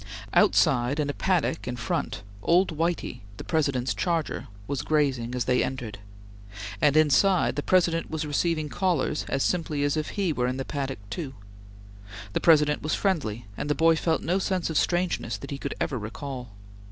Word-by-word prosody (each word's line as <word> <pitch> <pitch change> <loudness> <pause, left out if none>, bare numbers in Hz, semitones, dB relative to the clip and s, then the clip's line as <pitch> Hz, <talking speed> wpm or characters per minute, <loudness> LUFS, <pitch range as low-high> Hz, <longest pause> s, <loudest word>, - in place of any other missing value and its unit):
Outside, 120 +6 +3
in 145 -1 +1
a - - -9
paddock 170 -4 0
in 125 - -2
front, 115 -3 -3 0.2
"Old 175 - +3
Whitey," 165 -6 -1 0.2
the - - -7
President's 140 -5 0
charger, 165 -3 -1 0.2
was 140 - -2
grazing, 130 -6 0
as 125 - -1
they 125 - +3
entered; 120 -6 -5 0.8
and 150 0 +4
inside, 165 +5 +4
the 145 - -1
President 170 -1 +2
was 160 -1 -3
receiving 155 +1 0
callers 165 -3 0
as 135 - +1
simply 160 -5 0
as 145 +1 +1
if 155 -1 -2
he 190 -5 +1
were 125 -2 0
in 130 +1 -2
the 135 - -3
paddock 135 -2 -3
too. 140 -6 -5 1.0
The - - +1
President 150 -3 +4
was 155 - 0
friendly, 125 - -1
and 145 - -4
the 145 - +2
boy 165 0 +4
felt 160 0 0
no 180 +4 +1
sense 185 -3 -1
of 155 - 0
strangeness 175 0 0
that 140 - -9
he 140 - -4
could - - -4
ever 135 -6 -1
recall. 125 +3 -6
150 Hz, 175 wpm, -26 LUFS, 130-165 Hz, 1.0 s, and